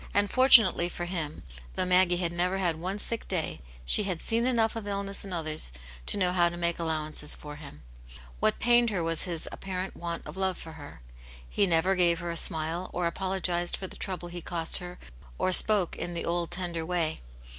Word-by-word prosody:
And 205 0 +3
fortunately 245 -9 +6
for 175 - -5
him, 165 -4 -4 0.3
though - - +1
Maggie 180 -1 +4
had 170 -1 -2
never 180 +2 0
had 175 -4 0
one 185 +5 -3
sick 230 +2 -2
day, 175 -5 -2 0.3
she 60 - +2
had 185 -5 -2
seen 230 +6 +2
enough 230 -3 +1
of 220 -2 -5
illness 200 0 -3
in 195 - -8
others 155 - -2 0.4
to - - +3
know 180 -2 +1
how 175 -1 +3
to 175 - -7
make 170 0 -1
allowances 155 -2 0
for 150 0 -9
him. 140 - -12 0.6
What - - +2
pained 240 0 +4
her 190 -5 -1
was 165 +2 0
his 170 -3 -2
appa 195 - -9
rent 185 +1 -3
want 170 -1 -5
of - - -8
love 190 -1 -1
for 160 - -10
her. 145 - -12 0.4
He 200 - +1
never 175 +2 +3
gave 175 -2 +3
her 170 0 -4
a - - -4
smile, 165 +2 0
or 180 - -1
apologised 175 -1 -1
for 190 - -6
the - - -7
trouble 180 -2 -4
he 175 0 -7
cost 165 -1 +1
her, 180 -1 -8 0.4
or 185 - +1
spoke 195 -1 +4
in 175 0 -5
the 170 - -3
old 170 0 -1
tender 175 -2 -3
way. 165 - -1
175 Hz, 210 wpm, -28 LUFS, 165-190 Hz, 0.6 s, fortunately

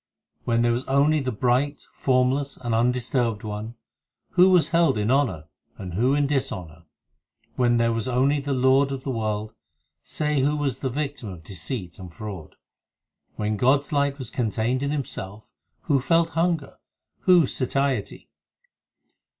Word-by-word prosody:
When 115 0 +2
there 120 - +3
was 120 +2 -1
only 145 +3 +3
the 130 -2 -2
bright, 130 +5 0
formless, 130 +2 +1
and 120 -2 -3
undis 120 +1 +1
turbed 115 -6 0
One, 110 +2 -5 0.6
Who 180 +1 +6
was 180 -3 +4
held 170 -8 +3
in 105 +3 0
honour 120 - +1 0.3
and 90 -3 -7
who 125 +9 +2
in 145 -1 +2
dishonour? 90 - -3 0.7
When 120 -1 +2
there 115 0 +2
was 115 0 -2
only 135 +4 +2
the 140 0 -4
Lord 130 +2 +3
of 135 -1 -5
the 135 - -2
world, 110 -2 -3 0.5
Say 150 -2 -1
who 145 +3 +2
was 145 -3 -2
the 130 - -2
victim 140 -3 -4
of 90 -4 -9
deceit 95 - -6
and 90 -2 -9
fraud. 95 -2 -8 0.8
When 105 0 -2
God 130 +5 +4
s 145 - -13
light 140 -1 +1
was 130 -5 -7
contained 120 +2 -1
in 140 - -1
Himself, 110 -8 -5 0.4
Who 140 -2 +1
felt 165 +4 +2
hunger? 165 -4 -1 0.5
who 180 -4 +6
satiety 130 -3 -2
130 Hz, 160 wpm, -24 LUFS, 110-140 Hz, 0.8 s, Who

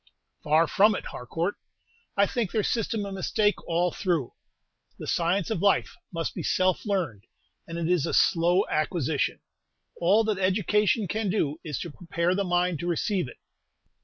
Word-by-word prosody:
"Far 155 +2 +4
from 210 +6 +4
it, - - -5
Harcourt. 165 +10 -3 0.6
I 200 - +5
think 235 -3 -1
their 215 +2 0
system 220 -2 -1
a 200 - -6
mistake 205 +2 0
all 175 +1 +1
through. 170 - -1 0.6
The - - -7
science 175 +4 0
of 185 - -1
life 200 -1 +2 0.2
must 165 -2 -3
be - - -5
self 185 +3 +1
learned, 165 - -2 0.4
and 165 - -6
it 170 -1 -1
is 175 -4 +2
a - - -1
slow 175 +3 +3
acquisition. 155 -2 -1 0.6
All 200 +6 +4
that 215 -3 -1
education 210 +3 +2
can 210 +3 -1
do 160 -6 0
is 150 -3 -4
to 170 - -5
prepare 170 +2 -1
the 200 +1 0
mind 175 -3 +1
to 175 - -4
receive 175 - 0
it. - - -12
180 Hz, 165 wpm, -27 LUFS, 165-205 Hz, 0.6 s, I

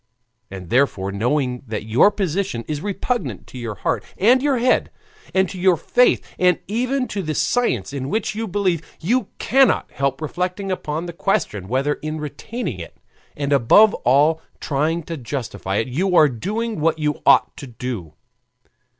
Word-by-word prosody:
And 95 -3 -9
therefore 120 -7 +2
knowing 125 +4 0
that 110 -1 -4
your 115 - +5
position 190 - -2
is 150 -1 -3
repugnant 200 - -3
to 130 - -10
your 115 -3 -5
heart 95 - -1
and 245 +6 +4
your 280 -2 +2
head, 250 +2 +2 0.4
and 190 0 +2
to 185 - -7
your 180 -1 +4
faith, 245 +9 +2
and 180 -2 +4
even 255 +5 -1
to 200 - -3
the 155 -4 -3
science 140 - 0
in 135 -1 -4
which 215 +4 -1
you 225 +1 -3
believe, 185 -4 0 0.2
you 240 +10 0
cannot 270 0 +3
help 135 -1 -1
reflecting 180 +5 -3
upon 160 -2 -3
the 170 - -6
question 105 - -1
whether 135 +6 +1
in 155 +1 -4
retaining 150 - -5
it, 85 - -9 0.4
and 145 0 0
above 170 - +6
all 145 +6 +4 0.2
trying 155 +4 -1
to 165 +1 -6
justify 120 -6 -4
it, 110 - 0
you 180 +9 0
are 155 - +7
doing 210 - -3
what 160 +1 +1
you 150 -2 -1
ought - - +5
to 140 - -8
do. 115 -10 -6
155 Hz, 165 wpm, -21 LUFS, 125-200 Hz, 0.4 s, are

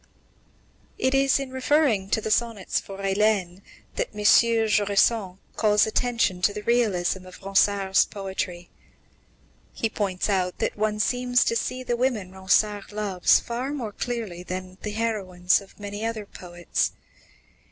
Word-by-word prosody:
It 260 +1 +1
is 275 0 +3
in 275 -1 -5
referring 260 -7 +1
to 220 - +1
the 215 - -3
sonnets 230 -4 0
for 195 - -10
Hélène 195 -2 0 0.4
that - - -1
M. 210 - -5
Jusserand 210 -3 +3 0.2
calls 210 -1 +3
attention 230 -5 0
to 205 - +3
the 210 +1 -7
realism 195 -6 +1
of 185 - -12
Ronsard's 195 0 +3
poetry. 190 -3 -5 1.0
He 225 - -2
points 195 -5 -2
out 185 -3 0
that - - -2
one 210 0 -1
seems 245 +2 +2
to 230 - 0
see 255 +2 -2
the 240 -1 -1
women 235 -7 -1
Ronsard 195 +2 +1
loves 205 -4 +2
far 245 +4 -4
more 235 -7 -4
clearly 220 -6 -4
than 185 +1 -7
the 210 - -4
heroines 195 -5 0
of 200 - -18
many 205 +1 -6
other 225 -2 -3
poets. 175 -3 -3
210 Hz, 140 wpm, -25 LUFS, 190-230 Hz, 1.0 s, is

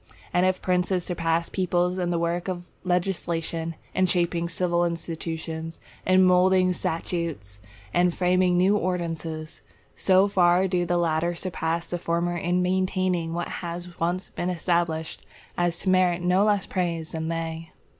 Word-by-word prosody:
And 180 +1 +4
if 185 0 -1
princes 180 0 +1
surpass 165 -1 0
peoples 180 -1 0
in 175 -1 0
the 175 - 0
work 170 +1 -1
of 180 -2 -3 0.2
legislation, 170 -2 -1 0.2
in 185 0 +2
shaping 170 -1 +1
civil 175 0 +1
institutions, 165 -1 -4 0.3
in 185 0 +6
moulding 185 0 +4
statutes, 160 - -3 0.3
and 180 0 +3
framing 180 0 +2
new 190 +3 +4
ordinances, 165 -4 -3 0.3
so 190 +1 +4
far 185 -1 +4
do 175 -1 0
the 175 - +1
latter 170 0 +1
surpass 170 -1 -2
the 175 - -4
former 170 +1 -1
in 175 +1 0
maintaining 185 -2 0
what 175 - -2
has 175 0 -6
once 175 +3 -1
been 175 - -2
established, 170 -2 -1 0.3
as 175 -1 0
to 190 - -2
merit 180 -1 +3
no 180 +3 +3
less 205 -2 +2
praise 170 -3 -2
than 160 0 -3
they. 165 0 -4
175 Hz, 145 wpm, -25 LUFS, 165-180 Hz, 0.3 s, in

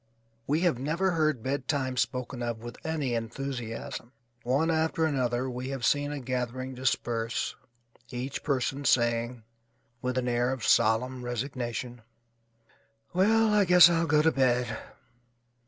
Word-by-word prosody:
We 150 +4 +1
have 170 -9 +2
never 165 +8 0
heard 155 -8 +1
bedtime 130 -1 -1
spoken 125 0 -2
of 120 -1 -2
with 120 +1 -10
any 150 -6 -1
enthusiasm. 115 0 -5 0.3
One 140 +7 +1
after 160 0 +1
another 130 -4 0
we 125 +1 -5
have 135 -4 -3
seen 145 0 +2
a 145 - -4
gathering 130 0 -3
disperse, 120 -2 -1 0.5
each 125 +2 -4
person 135 0 -1
saying 120 -2 +1 0.6
(with 125 0 -2
an 125 -1 0
air 120 +1 +1
of 130 -5 -3
solemn 125 +3 +2
resignation): 120 -1 -4 1.1
"Well, 215 +4 +4
I 210 -1 +5
guess 180 -2 +8
I'll 165 0 +1
go 150 0 +4
to 160 - +4
bed." 125 -3 +1
130 Hz, 135 wpm, -28 LUFS, 120-150 Hz, 1.1 s, guess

